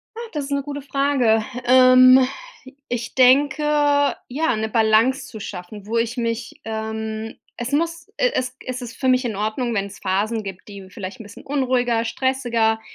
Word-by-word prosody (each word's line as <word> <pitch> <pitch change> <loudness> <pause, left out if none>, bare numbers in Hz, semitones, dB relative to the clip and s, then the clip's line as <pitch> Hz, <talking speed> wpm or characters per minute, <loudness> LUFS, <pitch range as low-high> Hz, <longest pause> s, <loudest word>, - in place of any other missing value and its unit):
Ah, - - -7
das 295 -3 -3
ist 280 - -9
'ne 280 0 0
gute 285 0 -6
Frage. 270 -5 +1 0.2
Ähm, 255 +1 +7 0.6
ich 240 -1 -4
denke, 275 +4 +4 0.6
ja, 290 0 0
'ne 220 0 -2
Balance 225 +4 +2
zu 220 - -9
schaffen, 200 +1 -8
wo 225 +2 -2
ich 230 +2 -1
mich 230 0 -3
ähm, 220 0 -5 0.2
es 240 +2 -4
muss 335 +3 -1
e - - +2
es 255 0 -2
es 255 0 -5
ist 230 -1 -8
für 265 - -1
mich 255 0 +3
in 225 -4 -2
Ordnung, 220 +4 -2
wenn's 200 -1 -3
Phasen 210 +4 -1
gibt, 195 0 -9
die 195 -2 -11
vielleicht 190 +4 -8
'n 225 - -8
bisschen 205 0 -13
unruhiger, 250 -4 0
stressiger 235 -3 0
240 Hz, 170 wpm, -21 LUFS, 220-260 Hz, 0.6 s, Ähm